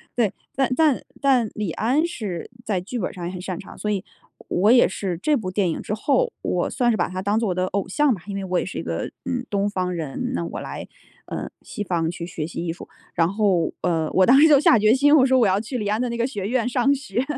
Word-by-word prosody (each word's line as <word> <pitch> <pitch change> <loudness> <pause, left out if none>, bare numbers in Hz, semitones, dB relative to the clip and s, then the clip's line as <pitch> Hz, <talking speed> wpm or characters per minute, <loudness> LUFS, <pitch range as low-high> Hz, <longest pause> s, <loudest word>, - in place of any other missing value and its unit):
对， 225 -5 +1 0.2
但 270 -2 +2
但 305 -4 +3 0.2
但 255 -5 +3
李 210 -5 -2
安 260 - +1
是 210 - -5
在 195 -5 0
剧 235 +7 -5
本 190 - -3
上 175 -2 -6
也 175 - -3
很 185 -1 -7
擅 185 -1 -4
长， 205 - -11
所 210 - -3
以 200 -2 -1 0.5
我 195 +4 +3
也 245 0 +7
是 190 -2 -3
这 300 +9 +2
部 215 -6 -4
电 185 -1 +1
影 160 - -3
之 - - -4
后， 465 - +1
我 - - -1
算 245 -2 +1
是 220 - 0
把 - - +1
他 185 0 -5
当 205 +3 +1
做 225 - 0
我 180 - -1
的 185 0 +1
偶 195 0 -2
像 280 +8 +2
吧， 190 - -7
因 200 - -4
为 195 - -3
我 185 -1 0
也 - - -2
是 190 - -6
一 - - -3
个， - - -3 0.2
嗯， 250 -1 -3
东 200 0 0
方 185 -3 -2
人， 155 -5 -3
那 85 - -2
我 85 - -5
来， - - -6 0.4
呃， - - -5
西 - - -8
方 170 -4 -1
去 170 -1 -6
学 155 -3 -4
习 170 +1 -5
艺 165 - -1
术， - - -12 0.3
然 170 +1 +2
后， 200 -5 +1
呃， 165 -3 0
我 185 - +4
当 255 +6 +6
时 - - +8
就 290 -2 +7
下 255 - +6
决 215 +1 +4
心， 290 +3 +5
我 265 -4 +6
说 260 -1 +4
我 230 - +4
要 190 +1 +2
去 240 +3 -4
李 210 -3 -2
安 210 +2 0
的 250 - -1
那 235 - -3
个 235 +1 +1
学 205 -8 -5
院 245 +1 0
上 250 +2 +2
学， 255 -4 -2
205 Hz, 290 characters per minute, -23 LUFS, 185-250 Hz, 0.5 s, 时